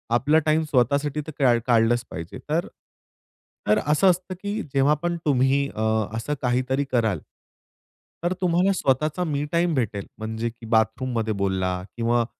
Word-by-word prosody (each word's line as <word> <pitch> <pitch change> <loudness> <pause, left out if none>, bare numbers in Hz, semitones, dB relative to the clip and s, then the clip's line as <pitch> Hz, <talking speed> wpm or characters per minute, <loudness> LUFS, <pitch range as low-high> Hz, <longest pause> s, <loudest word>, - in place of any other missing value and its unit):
आपला 145 +6 +3
टाईम 155 +1 +3
स्वतःसाठी 145 +1 +1
तर 155 - -5
का 125 -4 +4
काढलंच 120 0 +3
पाहिजे. 85 +4 -7
तर 165 +3 0 1.0
तर 105 - +4
असं 155 +6 +4
असतं 180 +1 -1
की 205 +2 -2
जेव्हा 140 +2 +4
पण 175 0 0
तुम्ही 140 0 +2
अ, 110 - -3 0.4
असं 145 +6 -2
काहीतरी 130 +2 0
कराल 110 - +1 1.0
तर 175 +1 +1
तुम्हाला 180 +2 +3
स्वतःचा 155 +3 0
मी 145 -3 -1
टाईम 170 -1 +2
भेटेल. 105 -6 -2
म्हणजे 110 +1 -3
की 115 0 -13
बाथरूममध्ये 110 0 0
बोलला 95 -1 -1 0.2
किंवा 120 0 +2
130 Hz, 145 wpm, -24 LUFS, 115-155 Hz, 1.0 s, का